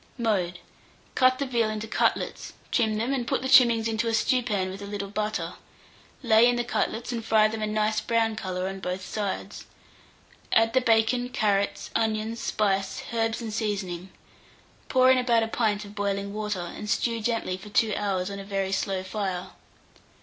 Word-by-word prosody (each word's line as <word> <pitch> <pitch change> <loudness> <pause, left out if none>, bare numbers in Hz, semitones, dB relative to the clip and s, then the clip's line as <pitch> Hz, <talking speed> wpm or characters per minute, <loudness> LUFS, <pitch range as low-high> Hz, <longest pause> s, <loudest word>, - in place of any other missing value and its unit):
Mode. 195 -7 0 0.6
Cut 255 0 +4
the 280 - -1
veal 235 -4 +1
into 215 0 -4
cutlets, - - -1 0.2
trim 220 -3 +2
them, 235 +5 0
and 245 -3 -2
put - - 0
the - - -1
trimmings 235 -4 +6
into 225 0 -1
a 225 - +1
stewpan 215 -5 +1
with 195 +2 -8
a 200 - -6
little 200 -1 -5
butter; 215 0 -2 0.7
lay 230 0 +6
in 245 - +2
the 240 - 0
cutlets 235 0 -2
and 230 -2 -3
fry 220 -1 +4
them 220 0 -5
a 215 - 0
nice 215 0 0
brown 225 -1 +1
colour 185 -3 -3
on 195 0 -5
both 185 0 -4
sides. 205 -3 -4 0.9
Add 225 0 +4
the 260 - +4
bacon, 240 +1 +2
carrots, 200 -4 0
onions, 220 +1 0
spice, 195 -2 -1
herbs, 225 0 0
and 220 -2 -5
seasoning; 195 -4 -3 0.8
pour 255 0 +5
in 260 - +4
about 235 -2 +3
a - - -1
pint 215 -2 0
of 200 - -11
boiling 200 -1 -2
water, 210 -3 -2
and 210 - -6
stew 230 0 0
gently 225 -4 -1
for 190 +3 -11
2 215 +1 +2
hours 195 -2 -1
on 200 - -6
a - - -6
very 195 -1 -2
slow 195 -1 -1
fire. 190 -2 -3
215 Hz, 180 wpm, -26 LUFS, 200-230 Hz, 0.9 s, trimmings